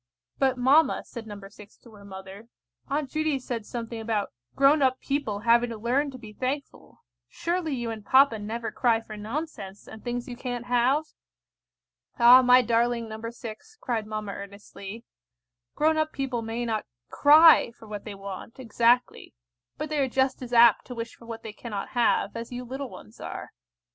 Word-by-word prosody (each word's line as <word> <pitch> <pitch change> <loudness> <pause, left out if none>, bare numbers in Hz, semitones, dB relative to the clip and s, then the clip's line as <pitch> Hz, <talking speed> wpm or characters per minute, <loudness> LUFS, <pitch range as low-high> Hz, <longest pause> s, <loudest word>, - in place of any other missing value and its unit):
"But, 265 -2 +2
mamma," 275 +6 +4
said 230 -2 -9
No. 205 -1 -8
6 205 0 -16
to 235 - -18
her 205 -1 -14
mother, 190 +2 -10 0.4
"Aunt 280 -1 -2
Judy 310 -2 0
said 240 -4 -5
something 230 -1 -5
about 220 -2 -2 0.2
grown 280 +2 +5
up 260 -1 +2
people 275 -8 -2
having 235 +1 +4
to 230 - -6
learn 255 +6 0
to 260 - -9
be 220 -4 -12
thankful. 265 +5 -5 0.2
Surely 335 - -2
you 240 -2 -3
and 220 -2 -7
papa 260 0 +4
never 225 +2 -4
cry 235 -3 +2
for 225 -1 -10
nonsense, 210 -3 -6
and 220 - -11
things 240 0 -4
you 245 - -6
can't 245 -1 -5
have?" 250 +5 +2 1.1
"Ah, 245 +1 +8
my 250 0 +6
darling 235 0 +1
No. 220 0 -7
6," 235 - -10
cried 225 -4 -2
mamma 215 -1 -4
earnestly, 200 +2 -9 0.7
"grown 315 +1 +2
up 310 0 0
people 260 -4 -3
may 230 +2 -3
not 220 -2 -2 0.2
cry 310 -1 +7
for 225 -1 -16
what 210 -1 -6
they 210 -2 -7
want 195 +3 -8
exactly, 240 - +1 0.4
but 305 +1 -4
they 305 -1 -1
are 270 -2 +1
just 265 +1 0
as 245 -1 -7
apt 235 -2 +6
to 250 - -8
wish 230 0 -5
for 230 - -16
what 230 -1 -7
they 220 - -7
cannot 210 -3 -6
have, 240 -2 +1
as 230 +1 -6
you 245 0 -5
little 265 +2 -6
ones 105 - -13
are. - - -7
235 Hz, 180 wpm, -26 LUFS, 220-265 Hz, 1.1 s, Ah